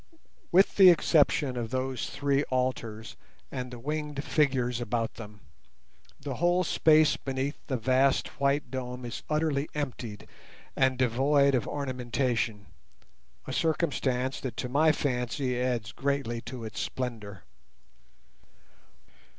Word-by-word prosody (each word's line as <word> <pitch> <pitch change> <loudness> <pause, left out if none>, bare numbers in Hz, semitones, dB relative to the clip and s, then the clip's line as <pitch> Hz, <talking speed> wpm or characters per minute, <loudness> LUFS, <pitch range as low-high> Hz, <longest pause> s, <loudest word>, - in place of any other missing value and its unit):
With 190 +3 +4
the 190 -2 +10
exception 150 -5 +3
of 120 -2 -3
those 130 0 -2
three 140 -1 +1
altars 115 -4 -3 0.4
and 125 -2 -4
the 125 - -8
winged 150 +2 -4
figures 130 -6 +1
about 115 -1 -2
them, 105 -2 -11 0.8
the 140 -3 -5
whole 175 +2 +2
space 155 -2 +4
beneath 135 +1 -3
the 130 - -1
vast 130 +3 +2
white 140 +1 +1
dome 125 -1 -5
is 120 - -6
utterly 150 -2 0
empty 125 -7 -4 0.6
and 130 -1 +2
devoid 135 +3 +3
of 125 -5 0
ornamentation—a 120 - -4
circumstance 135 -5 0
that 125 -4 -6
to 125 - -2
my 155 +5 +4
fancy 125 -2 -1
adds 120 -3 -1
greatly 135 -5 -2
to 120 -1 -8
its 110 - -6
splendour. 110 -6 -5
130 Hz, 120 wpm, -28 LUFS, 120-145 Hz, 0.8 s, the